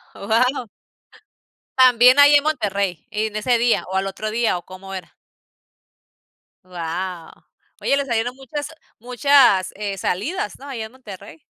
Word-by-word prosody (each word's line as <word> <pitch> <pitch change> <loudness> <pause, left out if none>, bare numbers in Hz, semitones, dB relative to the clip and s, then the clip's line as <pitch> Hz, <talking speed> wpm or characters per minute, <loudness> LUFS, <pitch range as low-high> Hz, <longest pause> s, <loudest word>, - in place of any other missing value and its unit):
Guau. 240 +4 0 1.1
También 255 +1 +6
allí 285 +1 +8
en 285 - +4
Monterrey, 200 - -2
¿en 215 0 -2
ese 235 +3 +1
día, 235 0 +1
o, - - -3
al 190 +1 0
otro 215 +2 -5
día. 225 -5 0
O, 175 - -10
cómo 195 +1 -11
era? 185 - -8 1.5
Guau, 175 0 -6 0.5
oye, 275 - +2
les 280 0 -1
salieron 240 0 -2
muchas 285 +2 -6 0.3
muchas, 250 -5 +3
eh, 200 -1 -4
salidas, 300 - -3
¿no? 280 - -11
Allá 235 -5 -5
en 220 - -12
Monterrey. 200 -10 -12
220 Hz, 140 wpm, -21 LUFS, 195-260 Hz, 1.5 s, allí